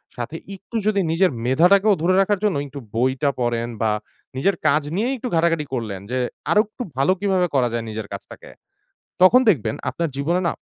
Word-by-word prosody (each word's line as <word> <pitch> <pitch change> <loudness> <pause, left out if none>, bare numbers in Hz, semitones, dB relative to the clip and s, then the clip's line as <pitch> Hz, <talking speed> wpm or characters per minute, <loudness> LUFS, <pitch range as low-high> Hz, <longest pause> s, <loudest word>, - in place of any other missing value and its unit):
সাথে 120 +6 -5 0.2
একটু 195 +4 -13
যদি 205 -2 +2
নিজের 180 +2 +3
মেধাটাকেও 185 - +4
ধরে 185 +3 +3
রাখার 200 0 +1
জন্য 210 -3 +2
একটু 140 +1 -8 0.2
বইটা 130 +4 +1
পড়েন, 120 -1 -1
বা 110 -1 +2 0.5
নিজের 190 +8 +2
কাজ 150 - +3
নিয়েই 240 +7 0
একটু 250 - -5
ঘাটাঘাটি 165 -2 +2
করলেন, 110 -6 -3
যে 130 - 0 0.3
আরো 210 - +6
একটু 220 +4 -7
ভালো 135 +6 +3
কিভাবে 190 -2 +1
করা 125 -2 +3
যায় 115 -1 -2
নিজের 110 -1 -5
কাজটাকে, 100 - -10 0.7
তখন 210 +8 +7
দেখবেন 115 - +2 0.2
আপনার 170 -1 -2
জীবনে 165 +6 0
না - - 0
165 Hz, 180 wpm, -22 LUFS, 125-195 Hz, 0.7 s, তখন